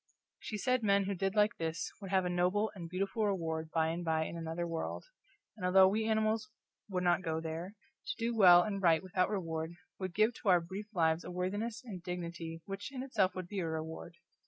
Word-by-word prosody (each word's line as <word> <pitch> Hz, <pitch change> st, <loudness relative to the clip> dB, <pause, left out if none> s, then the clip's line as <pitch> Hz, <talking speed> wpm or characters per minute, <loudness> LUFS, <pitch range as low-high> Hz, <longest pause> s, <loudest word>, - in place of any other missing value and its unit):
She 215 Hz, -, -5 dB
said 255 Hz, +4 st, +1 dB
men 200 Hz, -2 st, +3 dB
who 200 Hz, +1 st, -1 dB
did 195 Hz, +2 st, -1 dB
like 210 Hz, +2 st, +3 dB
this 165 Hz, 0 st, -3 dB
would 195 Hz, -, -6 dB
have 190 Hz, -1 st, +2 dB
a -, -, 0 dB
noble 185 Hz, +5 st, +1 dB
and 170 Hz, -5 st, -8 dB
beautiful 195 Hz, +4 st, -1 dB
reward 160 Hz, -5 st, -2 dB
by 160 Hz, 0 st, +1 dB
and 170 Hz, +2 st, -3 dB
by 160 Hz, -1 st, +1 dB
in 170 Hz, -, -6 dB
another 165 Hz, +1 st, -3 dB
world, 165 Hz, -1 st, -4 dB, 0.5 s
and 210 Hz, -, -10 dB
although 190 Hz, +1 st, +7 dB
we 220 Hz, +3 st, +1 dB
animals 220 Hz, 0 st, +1 dB, 0.4 s
would 180 Hz, -2 st, -1 dB
not 175 Hz, +1 st, +3 dB
go 160 Hz, -3 st, -1 dB
there, 165 Hz, +5 st, -5 dB, 0.3 s
to 405 Hz, -, -2 dB
do 235 Hz, +1 st, -1 dB
well 175 Hz, -4 st, +8 dB
and 200 Hz, -1 st, -3 dB
right 165 Hz, -2 st, +4 dB
without 185 Hz, 0 st, +1 dB
reward 165 Hz, -4 st, -3 dB, 0.2 s
would 185 Hz, -2 st, -4 dB
give 215 Hz, +3 st, +4 dB
to 205 Hz, -, +1 dB
our 180 Hz, -1 st, +7 dB
brief 190 Hz, +5 st, -7 dB
lives 160 Hz, -1 st, +2 dB
a -, -, -7 dB
worthiness 205 Hz, +7 st, -3 dB
and 195 Hz, -7 st, -7 dB
dignity 170 Hz, -2 st, -5 dB
which 195 Hz, +5 st, -6 dB
in 260 Hz, -2 st, -5 dB
itself 200 Hz, -8 st, +1 dB
would 185 Hz, -1 st, -5 dB
be 200 Hz, +1 st, -4 dB
a 170 Hz, -, -1 dB
reward. 160 Hz, +1 st, -5 dB
185 Hz, 215 wpm, -33 LUFS, 165-205 Hz, 0.5 s, well